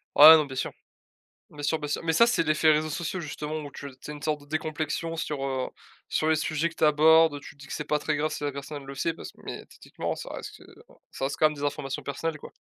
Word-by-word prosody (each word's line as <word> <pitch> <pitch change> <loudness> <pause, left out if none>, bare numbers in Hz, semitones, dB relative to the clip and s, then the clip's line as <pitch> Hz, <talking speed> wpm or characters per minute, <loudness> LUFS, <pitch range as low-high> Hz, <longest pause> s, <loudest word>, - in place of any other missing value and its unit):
Ouais, 155 +2 +12
non, 155 -2 +3
bien 135 -2 -8
sûr, - - -2 0.8
bien 145 -1 -9
sûr, 155 +2 +1
bien 150 -1 -5
sûr. - - -2
Mais 165 - +2
ça 230 +9 +6
c'est 235 -7 +2
l'effet 155 0 +4
réseaux 155 0 +2
sociaux 175 +4 -3
justement, 150 0 -5
ou 145 -1 -8
tu 140 - -8
c’est 150 - -7
une 145 - -10
sorte 150 -1 -1
de 145 - -16
décomplexion 155 +1 -3
sur, 150 -3 -3
heu, 130 -1 -2 0.4
sur 155 - 0
les 160 - +4
sujets 155 +1 0
que 170 - -14
tu - - +1
abordes, 160 +1 +6
heu, 145 - -6
tu 145 - -12
te 140 - -22
dis 145 - -11
que - - -8
c'est 150 - -3
pas 150 +1 +1
très 150 0 -1
grave 155 +1 0
si 150 -1 -4
la 145 - -1
personne 140 +2 -6
elle 135 - -13
le 140 - -7
sait 165 +4 -1
parce - - -9
que - - -29
mais - - -6
techniquement - - -5
ça - - -8
reste, - - -8
heu, - - -16 0.4
ça - - -4
reste 140 - -2
quand 155 - +6
même 155 - 0
des 145 - -4
informations 140 -1 -3
personnelles 150 +3 -3
quoi. - - -11
150 Hz, 285 wpm, -27 LUFS, 145-155 Hz, 0.8 s, Ouais